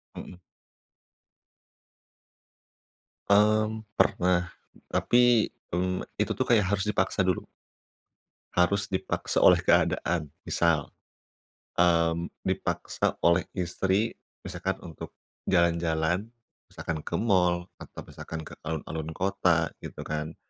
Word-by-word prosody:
Mhm. 90 - -9 2.9
Mmm, 110 +2 +3 0.2
pernah, 90 0 +2 0.3
tapi, 120 -2 +3 0.2
mmm, 90 +1 -1 0.2
itu - - 0
tuh - - +1
kayak 105 -6 +3
harus 100 +1 0
dipaksa 95 -2 +1
dulu. 90 -1 0 1.1
Harus 95 +3 +2
dipaksa 95 - -1
oleh - - +7
keadaan. 80 -4 +2 0.2
Misal, 85 -4 +1 0.9
mmm, 85 -1 +2 0.2
dipaksa - - -1
oleh 85 +1 +3
istri, 95 +4 0 0.3
misalkan 95 0 -3
untuk 80 - -8 0.4
jalan-jalan, 85 +2 +1 0.4
misalkan 80 -2 -5
ke - - -6
mall 90 -5 +2 0.2
atau - - -10
misalkan 80 0 -7
ke - - -9
alun-alun 80 0 -4
kota, 90 -4 +1
gitu - - -8
kan. 75 +1 -4
90 Hz, 95 wpm, -27 LUFS, 85-100 Hz, 2.9 s, oleh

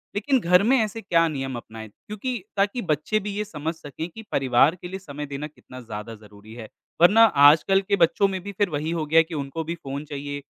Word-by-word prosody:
लेकिन 260 +6 +1
घर 180 -2 +4
में 255 +5 +4
ऐसे 220 0 -2
क्या 165 -4 +2
नियम 135 -4 -4
अपनाएँ 110 -1 -9
क्योंकि 210 - -6
ताकि 200 +5 +1
बच्चे 155 +9 0
भी 205 0 -5
ये 210 - -1
समझ 160 -4 -4
सकें 155 +1 -7
कि 225 +6 -11
परिवार 135 +4 +3
के 175 - -6
लिए 190 +2 -6
समय 150 -4 -7
देना 140 +1 -6
कितना 130 -4 -13
ज़्यादा 110 0 -8
ज़रूरी 105 0 -15
है, 115 -2 -9 0.3
वरना 205 +6 +7
आजकल 165 +1 +5
के 200 +1 0
बच्चों 195 +3 +3
में 190 -1 -4
भी 200 - -6
फिर 205 -2 +1
वही 155 +1 -3
हो 165 -2 -2
गया 160 +2 +4
है - - +5
कि 165 +1 -11
उनको 140 +2 -4
भी 165 +2 -4
फ़ोन 140 -2 -7
चाहिए, 145 0 -6
160 Hz, 225 wpm, -24 LUFS, 140-200 Hz, 0.3 s, वरना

